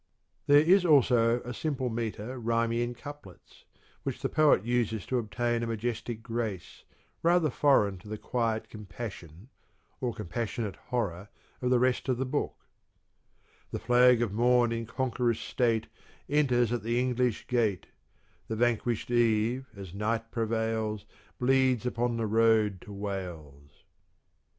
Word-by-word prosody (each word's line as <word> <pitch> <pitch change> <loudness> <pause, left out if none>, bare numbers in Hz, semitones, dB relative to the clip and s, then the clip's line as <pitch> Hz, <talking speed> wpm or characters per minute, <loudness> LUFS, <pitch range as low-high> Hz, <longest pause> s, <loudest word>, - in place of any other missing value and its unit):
There 145 - +7
is 180 +4 +5
also 120 -7 +4
a 120 - -6
simple 135 -3 -2
metre 115 +2 -4
rhyming 115 0 0
in 120 0 -1
couplets, 145 -9 -12 0.4
which - - -5
the - - 0
poet 150 -10 +4
uses 115 -4 0
to 130 - 0
obtain 120 +2 -1
a 115 - -2
majestic 115 0 -3
grace 115 -5 -4 0.4
rather 170 -3 +3
foreign 105 -10 +3
to 95 - -15
the 110 +1 -5
quiet 115 -1 -1
compassion, 100 -3 -9 0.5
or 125 -2 -1
compassionate 105 +1 -4
horror, 105 -6 -2 0.3
of 125 - 0
the 125 - +4
rest 125 +2 +1
of 125 - +1
the 130 - -1
book: 145 +3 -3 1.0
The - - -4
flag 125 0 +4
of 105 -4 -3
morn 120 +1 +3
in 115 -1 -3
conqueror's 125 -2 -1
state 115 -3 0 0.4
Enters 125 -6 +2
at 120 - -1
the 115 +3 0
English 125 -2 0
gate; 110 -7 0 0.6
The 110 - -3
vanquished 120 0 0
Eve, 120 +2 +2
as 95 -3 -9
night 115 +3 -2
prevails 110 -2 -1 0.3
Bleeds 130 -1 +2
upon 120 -1 -1
the 115 - -1
road 110 -3 +3
to - - -11
Wales. 85 -8 -7
115 Hz, 140 wpm, -29 LUFS, 110-125 Hz, 1.0 s, There